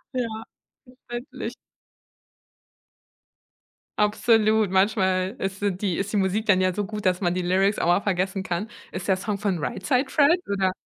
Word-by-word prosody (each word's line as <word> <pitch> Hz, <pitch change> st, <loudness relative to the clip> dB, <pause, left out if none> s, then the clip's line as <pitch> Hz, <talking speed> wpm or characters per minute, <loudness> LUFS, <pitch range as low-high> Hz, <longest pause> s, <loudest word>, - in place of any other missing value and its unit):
Ja, 225 Hz, -3 st, -3 dB, 0.4 s
verständlich. 250 Hz, -1 st, -7 dB, 2.5 s
Absolut, 215 Hz, -1 st, +3 dB
manchmal 190 Hz, 0 st, +2 dB
ist 195 Hz, +1 st, -4 dB
so 205 Hz, -, +2 dB
die 185 Hz, -1 st, -2 dB
ist 200 Hz, +1 st, -2 dB
die 210 Hz, -, 0 dB
Musik 195 Hz, +3 st, 0 dB
dann 185 Hz, -3 st, +5 dB
ja 185 Hz, -1 st, +2 dB
so 205 Hz, +2 st, -2 dB
gut, 210 Hz, 0 st, -6 dB
dass 180 Hz, +1 st, +2 dB
man 175 Hz, -1 st, +1 dB
die 180 Hz, -, -1 dB
Lyrics 190 Hz, +3 st, +2 dB
auch -, -, 0 dB
mal 175 Hz, +3 st, +4 dB
vergessen 190 Hz, 0 st, -1 dB
kann. 185 Hz, +4 st, -3 dB, 0.2 s
Ist 185 Hz, -, -6 dB
der 190 Hz, -, +4 dB
Song 200 Hz, +2 st, -3 dB
von 200 Hz, -3 st, -1 dB
Right 185 Hz, +5 st, -4 dB
Said 260 Hz, +4 st, +1 dB
Fred 315 Hz, +4 st, +4 dB
oder 190 Hz, -2 st, +1 dB
200 Hz, 165 wpm, -24 LUFS, 185-220 Hz, 2.5 s, dann